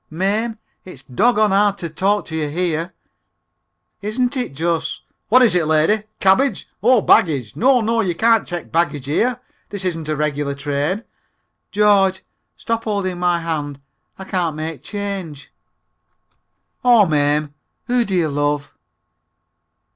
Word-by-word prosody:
"Mame, 210 +7 -1 0.3
it's 160 -8 -10
doggon 215 - +2
hard 200 0 +3
to 170 - -5
talk 195 +6 0
to 160 - -7
you 155 -2 -2
here." 170 +1 -2 1.1
"Isn't 245 +6 -1
it 245 - -3
just! 165 +2 -2 0.3
(What 250 +4 +6
is 230 - +4
it 175 -3 +1
lady? 160 +8 +2
Cabbage? 195 +4 +2
Oh, 240 +1 +4
baggage! 140 - +2
No, 255 +1 +3
no, 225 +1 +1
you 180 -5 -1
can't 225 +3 +3
check 175 -2 -6
baggage 160 -4 0
here; 240 - 0 0.3
this 200 -2 -5
isn't 165 -4 -3
a 155 - 0
regular 145 -1 -2
train.) 145 +8 -2 0.7
George, 195 -2 +3 0.3
stop 230 0 -3
holding 195 -4 -2
my 175 -1 +1
hand! 145 -4 -4 0.4
I 190 - -8
can't 175 -5 -2
make 155 -3 -5
change!" 195 -6 -6 1.3
"Aw, 240 -4 +6
Mame, 150 -2 +1 0.3
who 245 0 +2
do 195 -4 -3
you 170 -3 +1
love?" 145 0 -1
180 Hz, 140 wpm, -19 LUFS, 155-210 Hz, 1.3 s, What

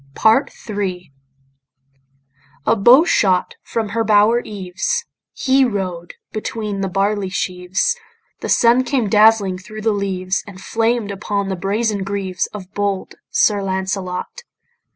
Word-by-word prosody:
PART 225 +6 +3 0.2
III 185 -7 -4 1.5
A - - +4
bow 240 +9 +6
shot 185 - +2
from 225 -2 -3
her 225 +2 0
bower 215 +2 +4
eaves, 210 - -3 0.3
He 265 0 +2
rode 185 -7 -3 0.2
between 215 -2 -4
the 195 - 0
barley 195 +1 0
sheaves, 185 - -1 0.4
The - - -5
sun 240 +2 +4
came 255 -6 0
dazzling 210 -3 +4
thro' 215 +3 -10
the 220 +1 +1
leaves, 190 -2 -2
And 195 -2 -10
flamed 225 0 0
upon 200 0 -2
the 190 - -1
brazen 205 +3 -1
greaves 190 -2 -2
Of 195 -3 -9
bold 200 -2 -2 0.2
Sir 205 -2 +2
Lancelot. 190 - -3
200 Hz, 130 wpm, -19 LUFS, 190-225 Hz, 1.5 s, bow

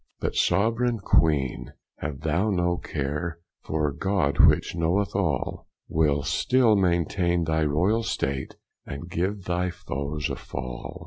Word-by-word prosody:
But - - -2
soveraigne 115 +3 +2
Queene, 75 -9 +1 0.2
have 75 -1 -5
thou 85 +7 +1
no 90 -3 +1
care, 75 +4 -3 0.2
For 75 -2 -1
God, 95 -2 0
which - - +2
knoweth 85 +5 0
all, 90 -9 -1 0.2
Will 75 -2 +1
still 125 - +3
maintaine 85 -1 +1
thy 80 -1 +1
royall 90 +10 +2
state, 70 -11 -2 0.3
And 70 +5 -8
give 95 +4 -1
thy 90 +1 -1
foes 70 -3 -4
a - - -2
fall. 65 -1 -7
85 Hz, 130 wpm, -26 LUFS, 75-95 Hz, 0.3 s, still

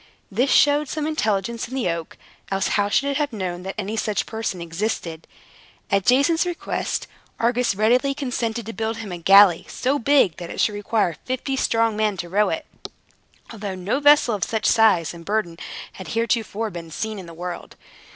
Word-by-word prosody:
This 245 +7 +1
showed 290 0 +4
some 310 -1 -2
intelligence 230 -7 -1
in 260 - -7
the 260 -6 0
oak; 165 -1 -6 0.3
else 195 0 0
how 205 -1 +1
should 275 +6 +2
it 275 - -1
have 295 -2 -1
known 185 -5 -4
that 190 +1 -6
any 210 +1 -3
such 215 -2 -1
person 220 -5 -4
existed? 170 -1 -4 0.6
At 195 -1 +1
Jason's 280 +6 +4
request, 350 -1 -3 0.3
Argus 235 -2 +1
readily 250 +7 +2
consented 240 -5 -2
to 225 - -6
build 220 +2 -2
him 220 -4 -7
a 175 - -5
galley 195 0 +6
so 275 +3 0
big 265 - +3
that 175 -1 -7
it - - -7
should 210 - +2
require 205 -4 0
fifty 260 +2 -2
strong 230 -4 +1
men 210 -2 0
to 175 0 -5
row 205 +3 +2
it; 320 -2 -3 0.9
although 200 -3 -5
no 185 +9 -1
vessel 290 -4 +5
of 205 - -1
such 220 -1 -1
a - - +5
size 205 -8 +3
and 170 -1 -11
burden 180 -3 -2 0.3
had 190 - -9
heretofore 225 -1 -1
been 170 -2 -8
seen 215 +6 -4
in 180 - -9
the 165 - -11
world. 175 +1 -7
220 Hz, 190 wpm, -22 LUFS, 190-250 Hz, 0.9 s, galley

